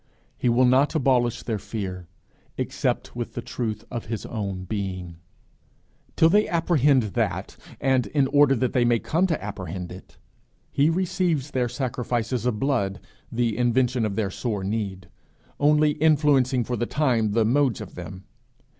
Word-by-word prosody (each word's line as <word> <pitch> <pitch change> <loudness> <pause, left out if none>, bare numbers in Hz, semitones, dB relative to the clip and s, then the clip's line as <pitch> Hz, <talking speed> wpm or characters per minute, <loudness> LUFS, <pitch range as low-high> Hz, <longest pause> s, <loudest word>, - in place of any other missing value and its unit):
He 125 - 0
will 120 +2 +4
not 135 +5 +3
abolish 125 -5 +2
their 110 -3 -2
fear 95 -5 -5 0.5
except - - -2
with - - -5
the - - -3
truth 110 -3 -4
of 120 -2 -4
his 110 -2 -4
own 100 -5 -4
being. 95 -4 -4 1.0
Till 160 - +5
they 210 +5 +4
apprehend 150 -6 +3
that, - - -2 0.2
and 130 -4 +2
in 140 +6 +2
order 145 0 +4
that 130 0 -1
they 125 - +3
may 120 0 +3
come 170 +10 +1
to 165 -4 -1
apprehend 95 -3 -6
it, 90 - -12 0.5
he 145 +3 +3
receives 170 -5 0
their 125 -2 0
sacrifices 125 -1 -2
of 110 -4 -1
blood, 110 -9 0 0.3
the 115 -2 0
invention 125 0 +1
of 105 -2 -1
their 100 -3 -1
sore 105 -2 -3
need, 95 -2 -3 0.5
only 150 +1 +4
influencing 145 -4 +3
for 125 - -3
the 120 +1 -2
time 120 -8 +1
the 115 0 +3
modes 130 -1 +2
of - - -8
them. 95 0 -8
120 Hz, 155 wpm, -25 LUFS, 105-140 Hz, 1.0 s, Till